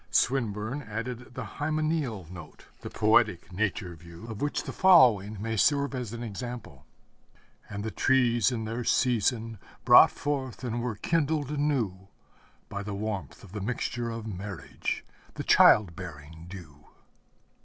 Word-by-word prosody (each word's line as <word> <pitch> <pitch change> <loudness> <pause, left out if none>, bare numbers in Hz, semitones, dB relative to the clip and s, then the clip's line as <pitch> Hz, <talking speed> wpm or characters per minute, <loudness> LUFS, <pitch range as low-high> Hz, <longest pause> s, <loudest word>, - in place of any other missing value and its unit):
Swinburne 120 0 0
added 120 +1 -6
the - - -4
hymeneal 155 - -2
note, 90 -2 -11
the - - -7
poetic 105 -5 +2
nature 95 -3 -2
view, 85 +4 -12
of 110 -2 -7
which 145 0 -1
the - - -6
following 115 - +5
may 110 +2 -2
serve 140 +5 +2
as 125 -5 -4
an 120 0 -6
example: 120 +1 -7 0.8
And 100 0 -5
the 110 - -3
trees 125 0 +3
in 115 -3 -3
their 115 +2 -3
season 115 -3 +1 0.3
brought - - +9
forth 135 -4 -4
and 120 -1 -2
were 120 -3 -2
kindled 150 +3 0
anew 125 -11 -1 0.6
By 100 - -5
the 100 0 -5
warmth 100 - -5
of - - -13
the 105 0 -5
mixture 120 +2 -2
of 115 -1 -5
marriage, 100 -2 -5 0.3
the - - -4
child 95 -6 +6
bearing 80 -1 -10
dew. 80 -6 -12
115 Hz, 145 wpm, -28 LUFS, 100-125 Hz, 0.8 s, brought